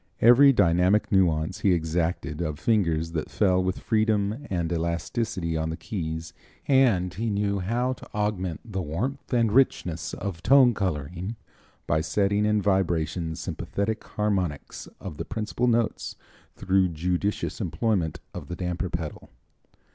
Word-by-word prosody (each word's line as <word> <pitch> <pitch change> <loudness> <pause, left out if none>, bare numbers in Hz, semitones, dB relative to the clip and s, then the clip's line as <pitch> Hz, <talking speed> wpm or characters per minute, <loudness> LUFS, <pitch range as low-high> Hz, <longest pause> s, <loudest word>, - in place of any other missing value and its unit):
Every 125 +5 +7
dynamic 90 -1 +3
nuance 85 -3 +2
he 95 - +3
exacted 80 -1 -1
of 75 -3 -2
fingers 85 -7 +1
that 80 -2 -3
fell 95 -3 +2
with 95 0 -1
freedom 110 +3 0
and 85 -3 -1
elasticity 85 +2 -2
on 80 0 -1
the 80 - -4
keys, 80 -5 -5 0.3
and 115 -10 +3
he 115 +4 -2
knew 100 -1 0
how 120 +7 0
to - - -13
augment 100 -6 -2
the 100 -4 -4
warmth 105 - -4
and 115 -4 +2
richness 90 -10 +1
of 95 -5 -5
tone 125 +4 +6
coloring 90 +1 -3 0.5
by 80 - +1
setting 100 +6 +1
in 105 -1 +2
vibration 85 -4 0
sympathetic 100 +6 -3
harmonics 95 -8 -2
of 85 -6 -7
the - - -4
principal 115 +3 -2
notes 115 -2 0 0.4
through 95 -1 +2
judicious 90 +7 -2
employment 90 -1 -1
of - - -7
the 85 - -5
damper 90 +1 -3
pedal. 80 -3 -5
95 Hz, 140 wpm, -26 LUFS, 85-105 Hz, 0.5 s, Every